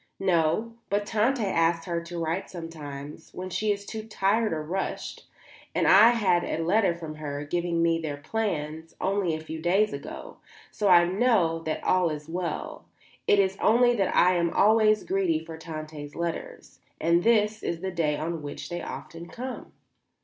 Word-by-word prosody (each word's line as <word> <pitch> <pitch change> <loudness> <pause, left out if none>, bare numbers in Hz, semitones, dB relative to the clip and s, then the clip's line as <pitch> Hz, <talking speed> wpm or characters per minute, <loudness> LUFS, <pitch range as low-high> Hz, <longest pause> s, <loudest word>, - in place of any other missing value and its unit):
"No; 180 +4 +1 0.2
but 205 +1 0
Tante 225 +3 +1
asks 165 -3 +1
her 170 -1 -2
to 170 +1 -8
write 165 +3 -2
sometimes, 150 -4 -8
when 185 0 -6
she 210 +4 0
is 200 0 -3
too 220 - -5
tired 215 +1 +1
or 155 -1 -2
rushed; 185 +5 -4 0.5
and - - +2
I 210 +4 +8
had 205 -7 +2
a 165 - -2
letter 185 0 +2
from 160 -2 -7
her, 145 -1 -5
giving 170 +1 0
me 165 0 +2
their 150 -3 -4
plans, 160 -3 -3
only 190 -4 0
a - - -5
few 160 0 -7
days 195 +5 +2
ago; 140 - -8 0.3
so 210 - -3
that 180 -3 +8
I - - +2
know 185 -4 +2
that 160 - -3
all 180 -2 +3
is 150 -1 -6
well. 175 +1 -4 0.4
It 205 - +5
is 195 -1 +1
only 240 +2 +5
that 200 -5 0
I 180 +1 +5
am 170 -1 +1
always 215 +2 +4
greedy 190 -4 +1
for 160 - -8
Tante's 155 -2 -8
letters, 170 -1 -5 0.2
and 170 +1 +3
this 215 0 +2
is 170 -1 -3
the 190 0 -3
day 155 -4 0
on 165 +1 -3
which 145 -1 -7
they 175 0 -4
often 170 +1 -8
come." 255 +5 -7
175 Hz, 180 wpm, -27 LUFS, 160-205 Hz, 0.5 s, I